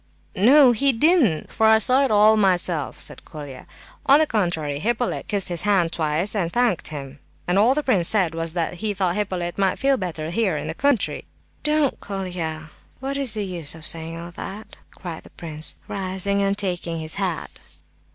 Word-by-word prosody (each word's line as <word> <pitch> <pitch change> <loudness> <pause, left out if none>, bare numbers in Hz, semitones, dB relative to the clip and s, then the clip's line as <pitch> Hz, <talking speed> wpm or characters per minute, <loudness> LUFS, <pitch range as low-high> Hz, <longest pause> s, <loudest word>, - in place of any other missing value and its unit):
"No, 255 +6 +6
he 275 +4 +2
didn't, 260 - +2
for 220 - +3
I 220 0 +6
saw 255 +5 +5
it 270 - +1
all 215 +1 +5
myself," 180 -7 +1
said - - -4
Colia. 145 -4 -10 0.4
"On 275 - +7
the 310 - +3
contrary, 170 - -1
Hippolyte 240 +6 -1
kissed 200 -3 +3
his 175 -2 +1
hand 195 -5 +2
twice 160 +4 -1
and 180 -6 -1
thanked 240 -6 0
him; 140 -2 -8 0.3
and 180 +2 +2
all 240 +6 +4
the 300 - -1
prince 190 -11 +2
said 185 -7 +2
was 165 0 -3
that 170 -2 -2
he 210 -2 -1
thought 185 -2 0
Hippolyte 185 -4 -3
might 195 -2 +1
feel 275 0 +2
better 165 -5 -4
here 190 -4 0
in - - -5
the 160 - -4
country!" 280 +4 0 0.4
"Don't, 300 -2 +1
Colia,—what 180 - -6
is 275 -5 0
the 210 -1 -2
use 170 -5 -3
of 160 0 -12
saying 165 0 -2
all 170 +1 -8
that?" 200 +5 -9
cried 170 -3 -8
the - - -16
prince, 155 -2 -2
rising 195 +1 -1
and 200 0 0
taking 175 -4 -2
his 155 0 +1
hat. 180 -4 -4
190 Hz, 185 wpm, -22 LUFS, 165-220 Hz, 0.4 s, On